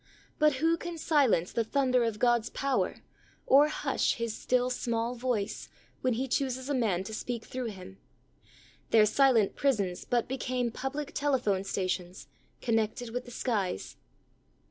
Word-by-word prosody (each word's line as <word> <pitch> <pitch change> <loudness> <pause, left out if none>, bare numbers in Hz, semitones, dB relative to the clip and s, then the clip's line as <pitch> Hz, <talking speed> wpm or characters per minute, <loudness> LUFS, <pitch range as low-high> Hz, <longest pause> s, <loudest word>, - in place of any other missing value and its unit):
But 305 -1 +5
who 325 +5 +2
can 345 0 -6
silence 280 - +2
the 230 - 0
thunder 255 0 +2
of 225 -2 -1
God's 240 0 +2
power, 275 -1 -1 0.4
or 285 +3 +6
hush 305 - 0
His 230 -2 -3
"still 250 0 +1
small 235 -1 -1
voice," 240 -5 -2 0.3
when 255 -1 +1
He 260 +4 -2
chooses 260 0 -1
a - - +1
man 210 -8 +1
to 220 - -7
speak 235 +1 -4
through 255 -1 -4
him? 190 -2 -9 0.9
Their 220 -2 +6
silent 235 -3 +3
prisons 205 -10 0
but 240 -2 0
become 250 -2 -2
public 280 +5 -4
telephone 250 -10 +1
stations, 185 -1 -3 0.3
con 230 -2 +2
nected 225 +2 -2
with 245 +1 -3
the - - -10
skies. 210 - -2
245 Hz, 150 wpm, -29 LUFS, 215-265 Hz, 0.9 s, or